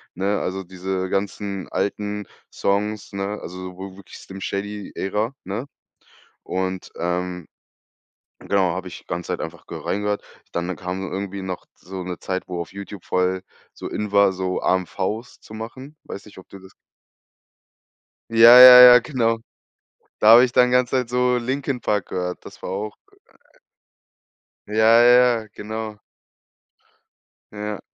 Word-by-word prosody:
ne? 100 +3 0
Also, 95 +1 -4
diese 95 +1 -4
ganzen 100 -1 -3
alten 105 0 -3 0.3
Songs, 105 +1 -2
ne? 100 +2 -3
Also, 90 +1 -8
w 95 0 -8
wirklich 100 -2 -13
„Slim 95 0 -11
Shady" 100 +3 -5
Ära, 105 +6 -2
ne? 105 +7 -5 0.8
Und, 95 0 -4
ähm, 90 0 -3 0.9
genau, 95 -4 +1
habe 95 0 -5
ich 90 - -11
ganze 85 +1 -4
Zeit - - -3
einfach - - -8
ge - - -7
reingehört. 105 0 -2 0.3
Dann 85 +2 -2
kam 90 +1 -5
irgendwie 100 0 -5
noch 95 -1 -6
so 95 +1 -9
'ne 90 -1 -5
Zeit, 95 -1 -3
wo 90 -1 -5
auf 85 - -8
Youtube 100 -1 -9
voll 90 0 0 0.3
so - - -8
in 105 -1 -4
war, 100 -1 +5
so 95 0 -3
AMVs 95 +5 -2
zu - - -14
machen. 130 +7 -9
Weiß 100 - -8
nicht, 105 - -16
ob 95 - -13
du 100 - -12
das 95 0 -16 1.6
Ja, 115 +2 +9
ja, 125 0 +12
ja, 125 0 +10
genau. 115 -3 -1 0.8
Da 105 - +2
habe 115 +2 +9
ich 125 - -5
dann 125 0 +4
ganze 125 -1 +2
Zeit 125 -2 -2
so 125 0 +2
„Linkin 130 +1 -3
Park" 105 -4 -1
gehört. 90 -1 -4
Das - - -13
war - - -6
auch 105 +3 -4 1.7
Ja 105 - -6 0.3
ja 120 -1 +5
ja, 110 - -14
genau. 110 0 -6 1.5
Ja, 105 -1 -5
100 Hz, 150 wpm, -22 LUFS, 95-110 Hz, 1.7 s, ja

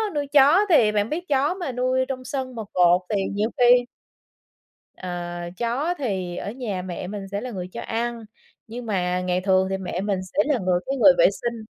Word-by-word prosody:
nuôi 290 -1 -1
chó 290 +8 +5
thì 235 -11 +5
bạn 210 +1 0
biết 350 +4 -4
chó 285 +3 +2
mà 350 -8 -4
nuôi 255 +1 0
trong 255 -1 -5
sân 260 -1 -4
mà 225 - -4
cột 180 0 +4
thì 200 - +1
nhiều 210 +2 0
khi 245 0 +5 1.1
Ờ, 185 - -7 0.5
chó 255 +9 -1
thì 190 -9 -3
ở 205 - -4
nhà 220 -6 -4
mẹ 180 0 -6
mình 200 0 -6
sẽ 200 0 -3
là 255 - -5
người 180 -4 -5
cho - - -5
ăn, 230 0 -3 0.4
nhưng 235 +2 -7
mà 180 -4 -1
ngày 180 0 -1
thường 190 0 +2
thì 190 - -1
mẹ 185 -1 -4
mình 200 -1 -1
sẽ 185 - -6
là 290 -4 +1
người 180 -2 +1
cái 275 +1 -1
người 270 - +7
vệ - - +6
sinh. 235 -2 -5
230 Hz, 210 wpm, -23 LUFS, 190-260 Hz, 1.1 s, người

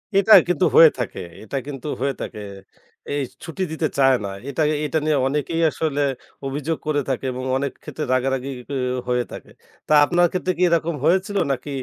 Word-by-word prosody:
এটা 200 +2 +6
কিন্তু 175 -4 +2
হয়ে 165 -1 +10
থাকে, 120 -5 -4 0.2
এটা 110 - -7
কিন্তু 140 0 -6
হয়ে 140 0 +1
থাকে। 105 - -6 0.7
এই 145 - 0 0.2
ছুটি 170 +3 -4
দিতে 160 0 -1
চায় 135 -1 +5
না। 100 - -3 0.2
এটা 140 +3 -2 0.2
এটা 150 +2 -1
নিয়ে 155 -2 +2
অনেকেই 150 +4 -1
আসলে 145 -2 -1 0.4
অভিযোগ 150 +4 -2
করে 145 -1 +1
থাকে 135 0 -2
এবং 130 +1 -5
অনেক 140 0 -2
ক্ষেত্রে 155 - -5
রাগারাগি 130 0 0 0.2
গিও 130 -2 -1
হয়ে 125 0 +1
থাকে। - - -10 0.4
তা - - +2
আপনার 175 +3 +3
ক্ষেত্রে 185 0 -1
কি - - -4
এরকম 170 -1 +1
হয়েছিল 190 +3 +2
নাকি, 135 +2 -3
145 Hz, 180 wpm, -22 LUFS, 135-165 Hz, 0.7 s, হয়ে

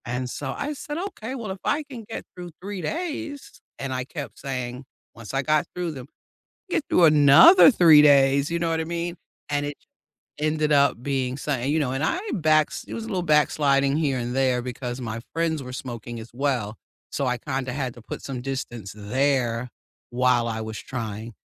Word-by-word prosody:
And 125 +1 -3
so, 135 +1 -4
I 290 +1 -3
said, 295 +1 -6
"Okay, 300 - -5
well, 225 -6 -5
if 190 - -6
I 305 +1 0
can 260 -5 -9
get - - -6
through 175 -1 -8
3 200 0 -5
days," 305 - -5 0.2
and 135 -1 -3
I 130 0 -2
kept 145 +2 -8
saying 125 -1 -4 0.3
once 115 0 -10
I 135 - +1
got 155 +2 +2
through 175 -2 -2
them, 130 -4 -9 0.6
"Get 345 - 0
through 175 - +4
another 155 - +8
3 165 - +7
days." 140 0 +5
You 170 - 0
know 170 -1 -1
what 160 0 0
I - - -1
mean? 170 +1 -3 0.3
And 145 0 0
it 145 0 -5 0.6
ended 155 0 0
up 140 -4 +3
being 130 -2 -1
something, 140 -2 -1
you 160 - +2
know, 140 -4 0
and 135 +2 -2
I 330 - +1
backs 155 -4 +2
it - - -7
was 230 - -5
a - - -8
little 190 -5 -1
backsliding 145 -3 +3
here 145 -5 +1
and 120 0 -3
there 130 -2 +2
because 125 0 -5
my 115 -2 -4 0.2
friends 165 -2 0
were 125 -1 -8
smoking 120 -2 -6
as 110 +1 -10
well, 120 -5 -1 0.3
so 140 - -1
I 125 0 0
kinda 135 -1 -3
had 130 -2 -3
to 120 - -14
put - - -8
some 130 -3 -5
distance 120 -6 -5
there 125 +2 0 0.4
while 125 -1 +2
I 110 -1 -3
was 110 -1 -6
trying. 115 -2 -6
140 Hz, 200 wpm, -24 LUFS, 125-165 Hz, 0.6 s, another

